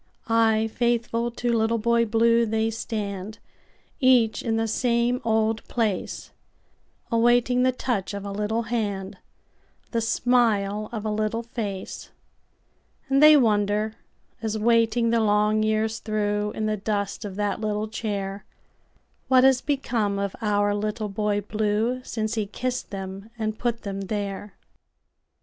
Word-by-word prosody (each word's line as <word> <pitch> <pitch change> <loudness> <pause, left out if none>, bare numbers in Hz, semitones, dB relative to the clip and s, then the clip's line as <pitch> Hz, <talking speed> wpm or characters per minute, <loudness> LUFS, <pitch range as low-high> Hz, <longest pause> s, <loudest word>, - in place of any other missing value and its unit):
Ay, 225 -1 +3
faithful 235 -1 0
to 240 0 -2
Little 225 0 +2
Boy 235 +1 +2
Blue 230 +1 +3
they 220 0 0
stand, 210 -2 -4 0.6
Each 250 -5 +4
in 225 -2 -1
the 225 0 0
same 240 +2 +1
old 220 0 +1
place, 220 -6 -2 0.8
Awaiting 240 +2 +3
the 255 0 +4
touch 235 -6 -2
of 200 0 -6
a 200 - -4
little 210 +3 -1
hand, 205 -5 -3 0.7
The 230 - 0
smile 215 -3 +1
of 220 -2 -5
a 215 - 0
little 215 +2 -1
face; 215 -5 -5 1.0
And 275 +1 +3
they 305 0 +9
wonder, 210 -3 +2 0.5
as 220 -1 -2
waiting 230 +1 +2
the 230 - +3
long 210 0 +2
years 220 +1 0
throughIn 210 0 -1
the 215 0 0
dust 200 0 -2
of 200 -3 -6
that 205 +1 -1
little 215 0 -1
chair, 200 -3 -4 0.8
What 255 -1 +5
has 265 -1 +5
become 235 -8 -1
of 200 -1 -2
our 205 -1 +2
Little 210 +1 -2
Boy 205 +1 0
Blue, 215 +4 -1
Since 220 -2 -3
he 215 -3 -1
kissed 250 +4 -3
them 195 +1 -7
and 215 -1 -3
put 235 -1 -2
them 195 -2 -4
there. 200 0 -4
220 Hz, 135 wpm, -25 LUFS, 205-235 Hz, 1.0 s, they